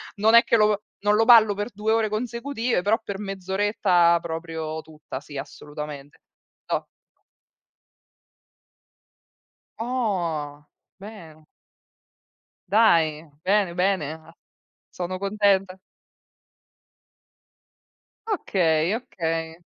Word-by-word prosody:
Non 220 +3 +4
è 235 - +8
che - - +3
lo 210 -1 +3 0.2
non 205 +1 +2
lo 225 +1 +3
ballo 225 -4 +7
per 205 +3 -4
2 210 +2 -1
ore 225 -1 +2
consecutive, 235 0 -2
però 210 +4 +2
per 200 -1 -5
mezz'oretta 190 -3 +1
proprio 160 -1 -5
tutta, 155 -4 -9
sì 145 0 -10
assolutamente. 145 0 -8 0.5
Toh. - - -2 2.9
Oh, 175 - -2 0.3
bene. 170 -7 -12 1.2
Dai, 165 -7 +3 0.2
bene, 195 -2 +2
bene, 180 -5 0
ah. 160 +1 -15 0.6
Sono 185 +1 -4
contenta. 195 -2 +1 2.5
Okay, 175 - +1
okay. 165 -8 -4
190 Hz, 90 wpm, -24 LUFS, 160-215 Hz, 2.9 s, è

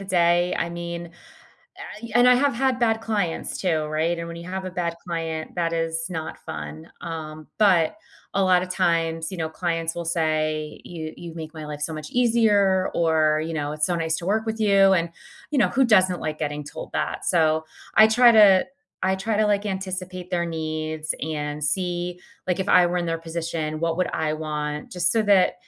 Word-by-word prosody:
the 195 - -7
day, 175 -1 +2
I 170 - 0
mean, 170 0 -6 0.9
I 235 - -6
and 245 +1 +6
I 250 - +7
have 275 +2 +2
had 260 +1 +1
bad 225 -2 +2
clients 205 -7 -2
too, 160 -5 0
right? 160 +3 -1
And 170 - -4
when 170 - -7
you 170 +1 -9
have 190 +1 -4
a 185 - -4
bad 170 -2 -2
client, 165 -2 -4
that 170 -1 0
is 165 0 -1
not 160 -3 -5
fun. 75 +1 -7
Um, 155 -2 -7
but 185 - +4 0.4
a 195 - +2
lotta 185 -1 +3
times, 165 -3 0
you 190 - -6
know, 160 -1 -1
clients 165 0 -2
will 170 - -4
say, 155 -2 -1
"You 160 -2 -7
you've 170 -1 -9
make 160 -1 -7
my 155 -2 -8
life 150 -1 -7
so 160 - -2
much 155 -1 -7
easier," 210 -6 +3
or, 155 -2 +2
you 165 - -4
know, 145 -1 -2
"It's 150 0 0
so 180 - 0
nice 160 -1 0
to 170 - -7
work 220 +3 0
with 220 0 -3
you." 195 -2 +5
And, 170 -2 0 0.4
you 295 - 0
know, - - +4
who 265 +2 +2
doesn't 185 -6 +4
like 155 0 -3
getting 150 -1 -3
told - - -9
that? - - -2
So, 160 -2 +2 0.3
I 215 - +8
try 235 +2 +6
to 205 -4 +7 0.4
I 190 +1 +2
try 210 +3 -1
to, 215 - +3
like, 205 0 +1
anticipate 185 -2 -5
their 175 -1 0
needs 155 -1 -3
and 150 -1 -3
see, 175 +2 -2 0.3
like, 180 +1 0
if 190 - -2
I 180 - +6
were 175 +1 -1
in 175 - -2
their 165 0 -1
position, 165 -1 -4
what 165 -1 0
would 185 0 0
I 155 -1 -1
want? 150 -1 -4
Just 180 0 +1
so 225 - +2
that 200 -3 +4
170 Hz, 205 wpm, -24 LUFS, 160-190 Hz, 0.9 s, I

